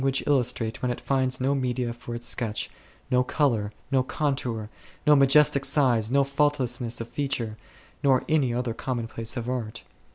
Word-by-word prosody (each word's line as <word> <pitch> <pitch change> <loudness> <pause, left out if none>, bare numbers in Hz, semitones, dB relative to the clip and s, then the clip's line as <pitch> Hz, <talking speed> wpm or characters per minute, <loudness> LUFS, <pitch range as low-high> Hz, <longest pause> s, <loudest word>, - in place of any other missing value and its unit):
But - - -1
how - - +4
can - - -2
language 145 +2 +1
illustrate 125 -4 0
when 125 - 0
it 120 - -4
finds 130 -1 0
no 135 +2 +1
media 125 -3 -1
for 120 0 -8
its 120 0 -6
sketch, 115 -3 -2 0.4
no 125 0 +4
colour, 120 -7 0 0.2
no 135 -1 +4
contours, 130 -5 -2 0.4
no 150 - +6
majestic 140 0 +5
size, 130 -6 +3
no 140 +2 +3
faultlessness 135 -4 0
of 115 - -5
feature; 120 -4 -2 0.5
nor 135 -2 +3
any 145 -6 +2
other 120 -1 -2
commonplace 115 -1 -4
of 120 0 -4
art 115 -3 -4
125 Hz, 175 wpm, -26 LUFS, 120-135 Hz, 0.5 s, no